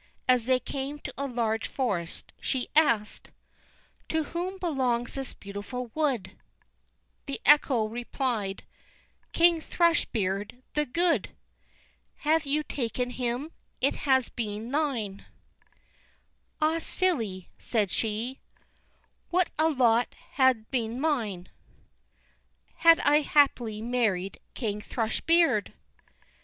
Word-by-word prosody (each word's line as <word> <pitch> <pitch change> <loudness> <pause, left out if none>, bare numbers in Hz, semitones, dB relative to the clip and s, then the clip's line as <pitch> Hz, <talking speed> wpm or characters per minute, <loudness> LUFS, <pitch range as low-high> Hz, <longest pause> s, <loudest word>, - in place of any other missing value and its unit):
As 250 -2 +3
they 255 -1 +4
came 275 +3 -4
to - - -8
a 280 +1 -3
large 225 -3 -1
forest, 190 -11 -3
she 260 -2 -2
asked: 235 -9 +2 0.8
"To 320 0 +1
whom 355 +5 -4
belongs 260 -9 0
this 270 -1 -5
beautiful 205 +5 -6
wood?" 280 -9 0 1.0
The 275 - -4
echo 275 -6 +5
replied: 235 -3 -3 0.7
"King 335 -1 +4
Thrush 340 +1 +2
beard 205 +3 -3
the 300 -1 0
good! 330 - +1 0.9
Had 310 0 +1
you 300 +2 +1
taken 245 -2 -2
him, 250 +5 -2 0.3
it 275 - +2
had 265 -3 +2
been 220 0 -4
thine." 250 -10 -2 1.3
"Ah, 315 +2 +2
silly," 235 - -1
said 210 -6 0
she, 225 +4 -2 0.9
"What 360 0 +2
a 320 +1 +4
lot 245 -5 +2 0.2
had 260 -5 +2
been 235 -2 -1
mine 225 - -1 1.3
Had 330 0 +7
I 295 +1 +5
happily 245 -8 +2
married 220 -6 0 0.2
King 210 -4 -2
Thrush 220 0 -2
beard!" 335 0 +3
250 Hz, 110 wpm, -28 LUFS, 220-295 Hz, 1.3 s, Had